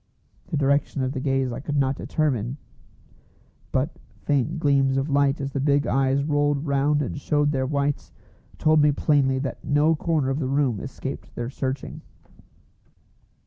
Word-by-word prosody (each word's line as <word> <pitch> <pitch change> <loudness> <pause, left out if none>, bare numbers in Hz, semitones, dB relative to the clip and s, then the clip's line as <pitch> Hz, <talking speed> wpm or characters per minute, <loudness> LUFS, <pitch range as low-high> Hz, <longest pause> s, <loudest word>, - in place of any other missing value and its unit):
The 160 - -2
direction 140 0 +1
of 130 - -1
the 135 - -3
gaze 135 -1 0
I 120 - -5
could 145 +2 -3
not 135 0 +2
determine; 130 -5 -1 1.1
but 135 +5 -1 0.2
faint 145 +3 0
gleams 135 -3 +2
of 135 +2 -1
light 140 +1 +2
as 140 0 -3
the 140 - -2
big 145 +1 +2
eyes 135 +1 +1
rolled 145 0 +1
round 145 +1 +2
and 140 +2 -5
showed 145 0 +1
their 130 -2 -1
whites, 140 0 -1 0.5
told 155 0 +4
me 150 0 +5
plainly 140 -2 +2
that 135 0 -4
no 150 +3 +3
corner 150 -4 0
of 135 - -1
the 130 -4 -2
room 135 -6 +1
escaped - - -7
their 120 +1 -4
searching. 135 -1 -4
140 Hz, 160 wpm, -24 LUFS, 135-145 Hz, 1.1 s, me